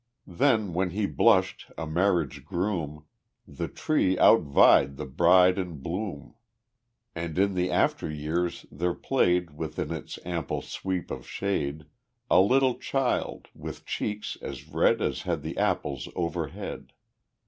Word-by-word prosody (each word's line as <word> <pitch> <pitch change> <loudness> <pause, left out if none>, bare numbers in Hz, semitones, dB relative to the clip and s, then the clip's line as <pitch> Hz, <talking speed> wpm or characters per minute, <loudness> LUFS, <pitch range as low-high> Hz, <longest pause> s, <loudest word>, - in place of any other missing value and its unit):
II 90 - -12
Then 110 -4 +2
when 90 +2 0
he 100 +4 -1
blushed, 75 - +2
a 80 - -3
marriage 80 -5 0
groom, 85 -4 -3 0.4
The - - -5
tree 95 -12 +1
outvied 70 -6 +5
the - - -5
bride 90 +7 +4
in 90 -3 -4
bloom; 85 +2 -5 0.8
And 80 -1 -5
in 100 +1 +3
the 90 0 0
after - - +1
years 80 +4 -2
there 85 +3 -1
played 90 - +1
Within 75 - -4
its 80 -3 -6
ample 85 -2 -3
sweep 95 -2 -4
of - - -6
shade 75 -7 -2 0.5
A 90 - +7
little 130 +4 +3
child, 135 -2 -1
with - - -8
cheeks 105 0 -4
as - - -7
red - - +2
As - - -1
had - - -2
the - - -5
apples 70 -3 -1
overhead. 85 -3 -4
90 Hz, 135 wpm, -27 LUFS, 75-95 Hz, 0.8 s, A